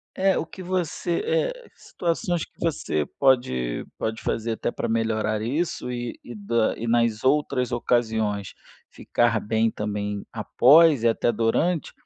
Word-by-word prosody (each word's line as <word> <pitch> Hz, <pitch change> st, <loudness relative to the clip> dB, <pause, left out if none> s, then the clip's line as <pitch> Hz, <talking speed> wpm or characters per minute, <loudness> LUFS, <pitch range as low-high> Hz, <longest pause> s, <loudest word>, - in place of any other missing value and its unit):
É, 190 Hz, 0 st, +2 dB
o -, -, -2 dB
que 185 Hz, +3 st, -10 dB
você, 175 Hz, -1 st, -1 dB, 0.3 s
eh, -, -, -12 dB
situações 170 Hz, -1 st, -2 dB
que -, -, -12 dB
você 145 Hz, -, -1 dB
pode, 65 Hz, -, +1 dB
pode 110 Hz, 0 st, -3 dB
fazer 115 Hz, 0 st, -2 dB
até 110 Hz, -, -2 dB
pra -, -, -3 dB
melhorar 110 Hz, -1 st, 0 dB
isso 145 Hz, +3 st, -2 dB
e 120 Hz, -1 st, -5 dB
e 120 Hz, -, -9 dB
da 110 Hz, +2 st, 0 dB
e 115 Hz, -, -4 dB
nas 115 Hz, -2 st, +1 dB
outras 130 Hz, -2 st, +1 dB
ocasiões 110 Hz, -4 st, 0 dB, 0.4 s
ficar 115 Hz, -2 st, 0 dB
bem 110 Hz, +2 st, +1 dB
também 105 Hz, -1 st, -4 dB
após 150 Hz, 0 st, +5 dB
e -, -, +5 dB
até 115 Hz, +1 st, +2 dB
durante 125 Hz, +9 st, 0 dB
120 Hz, 145 wpm, -24 LUFS, 110-150 Hz, 0.4 s, após